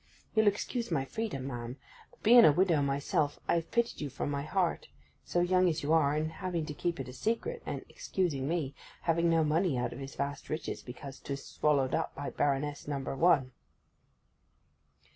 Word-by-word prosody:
You'll 220 Hz, -1 st, +4 dB
excuse 230 Hz, +4 st, 0 dB
my 140 Hz, -6 st, 0 dB
freedom, 205 Hz, -7 st, -3 dB
ma'am; 120 Hz, -1 st, -5 dB, 0.3 s
but -, -, -26 dB
being 235 Hz, +2 st, +9 dB
a 155 Hz, -, +8 dB
widow 170 Hz, -1 st, +3 dB
myself, 140 Hz, +1 st, 0 dB
I -, -, +3 dB
have 170 Hz, -1 st, 0 dB
pitied 235 Hz, 0 st, 0 dB
you 145 Hz, -, -2 dB
from 135 Hz, -, -3 dB
my 140 Hz, -1 st, -1 dB
heart; 175 Hz, +4 st, 0 dB, 0.4 s
so 175 Hz, -, 0 dB
young 185 Hz, +1 st, +4 dB
as 165 Hz, -1 st, -2 dB
you 150 Hz, +3 st, +2 dB
are, 150 Hz, -3 st, +4 dB
and 155 Hz, +1 st, -1 dB
having 175 Hz, -2 st, -3 dB
to 150 Hz, -, -5 dB
keep 170 Hz, +2 st, -2 dB
it 135 Hz, -, -4 dB
a 125 Hz, -, -8 dB
secret, 230 Hz, -, -2 dB
and -, -, -4 dB
(excusing 175 Hz, -, -2 dB
me) 155 Hz, -4 st, -1 dB, 0.3 s
having 170 Hz, 0 st, +2 dB
no 165 Hz, -1 st, +4 dB
money 155 Hz, -1 st, +2 dB
out 125 Hz, -, -1 dB
of 120 Hz, -, -8 dB
his 135 Hz, 0 st, -7 dB
vast 140 Hz, +1 st, -4 dB
riches 155 Hz, -, -3 dB
because 135 Hz, +2 st, -9 dB
'tis 140 Hz, -1 st, -5 dB
swallowed 140 Hz, -4 st, +1 dB
up -, -, -1 dB
by 140 Hz, +1 st, -4 dB
Baroness 145 Hz, +1 st, -1 dB
Number 135 Hz, -2 st, -3 dB
One. 135 Hz, -5 st, +4 dB
150 Hz, 190 wpm, -31 LUFS, 140-175 Hz, 0.4 s, being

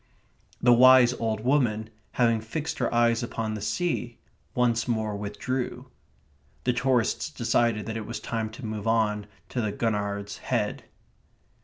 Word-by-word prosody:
The 120 Hz, 0 st, +5 dB
wise 125 Hz, 0 st, +7 dB
old 110 Hz, -3 st, -2 dB
woman, 115 Hz, -4 st, +1 dB, 0.2 s
having 115 Hz, -3 st, +2 dB
fixed 155 Hz, +8 st, -4 dB
her 125 Hz, -, 0 dB
eyes 120 Hz, 0 st, +3 dB
upon 115 Hz, -2 st, -3 dB
the 105 Hz, -, -5 dB
sea, 120 Hz, -, -2 dB, 0.4 s
once 120 Hz, -2 st, +2 dB
more 110 Hz, -3 st, -1 dB
withdrew. 125 Hz, +5 st, -4 dB, 0.7 s
The 125 Hz, -, +2 dB
tourists 125 Hz, -2 st, +1 dB
decided 115 Hz, -2 st, +1 dB
that 115 Hz, 0 st, -4 dB
it 110 Hz, -2 st, -6 dB
was 115 Hz, -, -4 dB
time 115 Hz, -2 st, -3 dB
to 120 Hz, +2 st, -8 dB
move 110 Hz, 0 st, -4 dB
on 105 Hz, -2 st, +1 dB, 0.2 s
to 125 Hz, -, -2 dB
the 105 Hz, -2 st, -1 dB
Gurnard's 100 Hz, -2 st, -2 dB
Head. 110 Hz, -5 st, -2 dB
115 Hz, 145 wpm, -27 LUFS, 110-125 Hz, 0.7 s, wise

